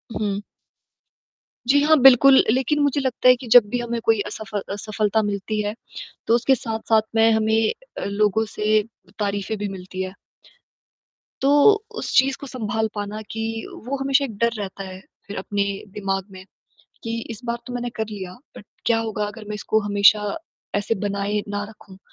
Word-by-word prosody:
हुँ। 205 -2 -1 1.3
जी, 285 +2 +5
हाँ 315 +1 +5
बिल्कुल, 270 +1 +8
लेकिन 265 +4 +1
मुझे 285 0 +2
लगता 255 -1 0
है 250 - +8
कि 245 0 -10
जब 245 - +10
भी 245 - -1
हमें 235 0 -3
कोई 225 -2 +3
असफ 210 0 -8 0.2
असफलता 215 +1 0
मिलती 205 +1 -2
है 205 0 -2 0.5
तो 230 - +5
उसके 260 +3 +3
साथ-साथ 220 -1 0
में 225 0 +5
हमें 220 0 +2 0.3
लोगों 210 +2 +1
से 215 0 +1 0.4
तारीफें 205 +1 -2
भी 205 0 -3
मिलती 185 0 -7
है। 185 - -6 1.3
तो 275 +1 +3 0.4
उस - - -4
चीज़ 265 +1 +4
को 280 - -7
सँभाल 220 -3 -2
पाना 205 +1 -4
कि 225 0 -3 0.4
वो 275 +2 -1
हमेशा 275 +1 +3
एक 225 - -8
डर 235 +2 +2
रहता 195 -1 -5
है 185 -1 -8 0.3
फिर 200 - -6
अपने 200 +1 -1 0.3
दिमाग 195 -2 -2
में 185 -1 -11 0.6
कि 230 0 -3
इस 225 +1 -7
बार 235 0 -1
तो 250 - -6
मैंने 245 0 -3
कर 220 - -2
लिया 190 -4 -7 0.2
बट - - -12 0.2
क्या 230 -1 +3
होगा 220 -2 -2
अगर 215 +1 -9
मैं 210 - -3
इसको 220 +1 0
हमेशा 205 +3 +3 0.4
ऐसे 205 +2 0
बनाए 200 +1 -1
ना 205 0 -2
रखूँ? 200 -3 -15
215 Hz, 170 wpm, -22 LUFS, 205-235 Hz, 1.3 s, जब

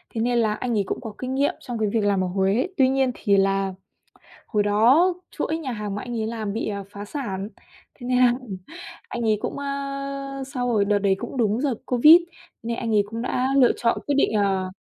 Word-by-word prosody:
thế 225 - -1
nên 240 +1 +1
là 220 -2 +2
anh 235 +1 -2
ấy 200 - +2
cũng - - -3
có 225 -3 -7
kinh 255 +1 -4
nghiệm 280 +1 +2
trong 245 -3 -5
cái 215 -1 +1
việc 220 +1 0
làm 200 -2 +2
ở - - -1
Huế. 195 - +1
Tuy 260 -2 +5
nhiên 265 -1 +2
thì 200 -3 +2
là 195 0 +1 0.7
hồi 210 -2 +1
đó 240 - +4 0.2
chuỗi 315 +1 -2
nhà 275 -6 -4
hàng 210 -3 -4
mà 205 - -4
anh 240 -2 -4
ấy 220 - -1
làm 220 -3 -3
bị, 225 - -3
à, 200 -1 -4
phá 205 0 -8
sản, 205 -5 -4 0.5
thế 245 - -10
nên 250 0 +2
là 250 -1 +5 0.8
anh 240 - -4
ấy 215 -2 +2
cũng, - - -4
a, 275 -1 -4
sau 245 -1 -1
rồi 215 -4 +2
đợt 205 0 +2
đấy 200 -1 +2
cũng 240 +4 -6
đúng 225 -1 +1
đợt 270 -5 +1
Covid, 300 +8 +7 0.4
nên 230 +1 -3
anh 230 -2 -1
ấy 205 - +5
cũng 230 +1 -4
đã 255 +1 0
lựa 250 -3 +6
chọn 230 -1 +1
quyết 290 - +1
định 275 - +2
ờ, 195 -3 +1
230 Hz, 230 wpm, -24 LUFS, 205-260 Hz, 0.8 s, Covid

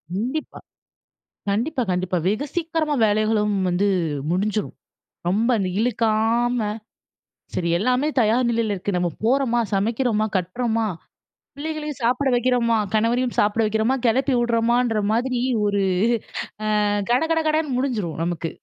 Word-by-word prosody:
கண்டிப்பா. 255 +9 -3 0.9
கண்டிப்பா 250 +7 0
கண்டிப்பா. 180 0 -1
வெகு 215 +9 0
சீக்கிரமா 325 -3 0
வேலைகளும் 210 0 +1
வந்து 180 +3 +1 0.4
முடிஞ்சுரும். 205 +3 -1 0.5
ரொம்ப 220 +6 +1
அந்த 190 -2 -1
இழுக்காம, 230 +1 +1 0.9
சரி, 170 -1 -1
எல்லாமே 255 +7 +1
தயார் 235 +3 +2
நிலையில 225 -3 0
இருக்கு. 190 0 -3
நம்ம 175 0 +1 0.2
போறோமா, 240 -1 +2
சமைக்கிறோமா, 220 +1 +1
கட்டுறோமா, 225 +5 -1 0.7
பிள்ளைகளையும் 300 -1 -5
சாப்பிட 250 +4 +1
வைக்கிறோமா, 240 -2 +2 0.2
கணவரையும் 240 +3 +1
சாப்பிட 210 +2 +2
வைக்கிறோமா, 220 +4 +1
கெளப்பி 260 +3 +2
விடுறோமான்ற 235 -1 +1
மாதிரி 245 +1 0 0.3
ஒரு 200 -1 +1 1.0
ஆ - - +2 0.2
கட 250 +4 +3
கட 325 - +2
கடன்னு 305 -4 0
முடிஞ்சிரும், 210 - -2
நமக்கு. 170 -1 -3
230 Hz, 115 wpm, -22 LUFS, 210-255 Hz, 1.0 s, கட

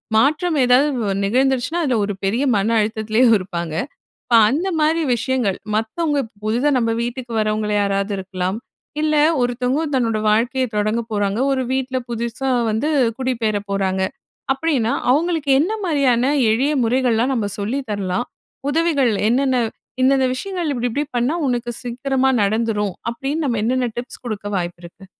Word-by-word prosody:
மாற்றம் 305 +7 +2
ஏதாவது 255 +4 +4 0.2
வ 195 - 0
நிகழ்ந்துருச்சுனா 260 +7 +1
அதுல 260 -5 +1
ஒரு 205 - -3
பெரிய 225 +8 +1
மன 205 +3 +1
அழுத்தத்துலயும் 220 +2 +2
இருப்பாங்க. 170 -4 -5 0.5
அப்ப 240 - +2
அந்த 320 +10 0
மாரி 320 +2 +2
விஷயங்கள், 240 -4 -1 0.2
"மத்தவங்க 290 +7 0 0.2
புதிதா 235 +7 +1
நம்ம 230 -2 +1
வீட்டுக்கு 245 0 -5
வரவங்கல 215 0 0
யாராவது 200 0 0
இருக்கலாம். 185 0 -3 0.4
இல்ல 310 0 +1 0.3
ஒருத்தவங்க 250 +4 0
தன்னோட 230 -4 +1
வாழ்க்கைய 250 +4 +1
தொடங்க 215 +2 +1
போறாங்க. 205 0 0
ஒரு 260 -1 0
வீட்டுல, 260 0 -1
புதுசா 235 +3 -3 0.2
வந்து 225 +8 0 0.3
குடிபெயர 235 -5 0
போறாங்க" 190 -1 0 0.5
அப்படின்னா, 270 -6 0 0.2
அவங்களுக்கு 320 0 +1
என்ன 345 +8 +1
மாரியான 275 -7 +2 0.3
எளிய 270 +7 +1
முறைகள்லாம், 245 +1 +2
நம்ம 220 -5 -1
சொல்லி 220 +7 -1
தரலாம்? 195 +2 -2 0.4
உதவிகள் 300 -6 +2 0.2
என்னென்ன 260 +2 +2 0.5
"இந்தெந்த 265 0 +4
விஷயங்கள் 350 +1 -3
இப்படி, 245 -1 -1
இப்படி 290 +3 -1
பண்ணா 245 +7 +1
உனக்கு 240 -1 -1
சீக்கிரமாக 260 +1 0
நடந்துரும்" 210 -2 0 0.2
அப்படின்னு, 280 +6 -3
நம்ம 235 -5 0
என்னென்ன 250 +1 +1
டிப்ஸ் 245 +1 -6
குடுக்க 210 -3 -4
வாய்ப்பிருக்கு? 175 +1 -7
245 Hz, 140 wpm, -20 LUFS, 215-270 Hz, 0.5 s, ஏதாவது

